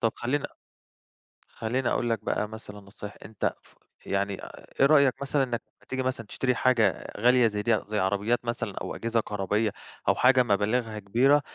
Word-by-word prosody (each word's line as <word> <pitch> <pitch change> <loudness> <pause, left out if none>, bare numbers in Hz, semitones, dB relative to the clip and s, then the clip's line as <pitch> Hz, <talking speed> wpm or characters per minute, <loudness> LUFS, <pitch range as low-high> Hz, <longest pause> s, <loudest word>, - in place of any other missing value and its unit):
طَب 115 -2 +2
خلّيني 145 +4 -1 1.0
خلّيني 120 +3 -2
أقول 120 -1 0
لك 110 -2 -1
بقى 105 - 0
مثلًا 105 -1 -9
نصايح، 100 +1 -10
أنت 110 - -2
ف - - -24 0.3
يعني 100 0 -1
آآ، - - -11
إيه 135 - +7
رأيك 140 -3 +5
مثلًا 140 0 +1
إنك 120 -2 -2 0.2
لما - - -25
تيجي 130 0 -1
مثلًا 130 -3 -2
تشتري 125 +2 0
حاجة 125 -4 +2
غالية 125 +1 +5
زي 105 -1 -2
دي، 110 -1 +2
زي 105 0 -1
عربيات 100 +6 0
مثلًا 120 0 -3
أو - - -4
أجهزة 115 0 0
كهربائية 105 +1 -1 0.4
أو - - +4
حاجة 125 0 +5
مَبالغها 110 +1 0
كبيرة، 130 +9 +3
115 Hz, 175 wpm, -27 LUFS, 105-125 Hz, 1.0 s, إيه